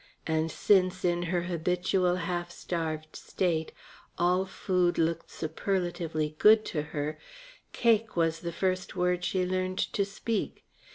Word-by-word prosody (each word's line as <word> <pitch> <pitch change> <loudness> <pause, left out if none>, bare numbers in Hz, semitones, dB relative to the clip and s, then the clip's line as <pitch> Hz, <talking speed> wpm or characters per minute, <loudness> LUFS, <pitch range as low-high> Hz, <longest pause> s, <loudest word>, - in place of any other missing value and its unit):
And 160 0 0
since, 185 0 +2
in 175 0 +2
her 175 -1 +1
habitual 180 +1 +1
half 175 0 -2
starved 160 -3 -4
state, 165 -4 -1 0.5
all 180 +2 +2
food 180 -2 0
looked 165 0 0
superlatively 165 -2 -2
good 215 0 +7
to 150 - 0
her, 150 0 -4 0.5
cake 225 -2 +2
was 165 -1 +1
the 170 0 -4
first 185 +1 -1
word 180 0 +1
she 185 0 0
learned 185 0 -1
to 200 - 0
speak. 205 +2 -3
180 Hz, 130 wpm, -29 LUFS, 165-185 Hz, 0.5 s, good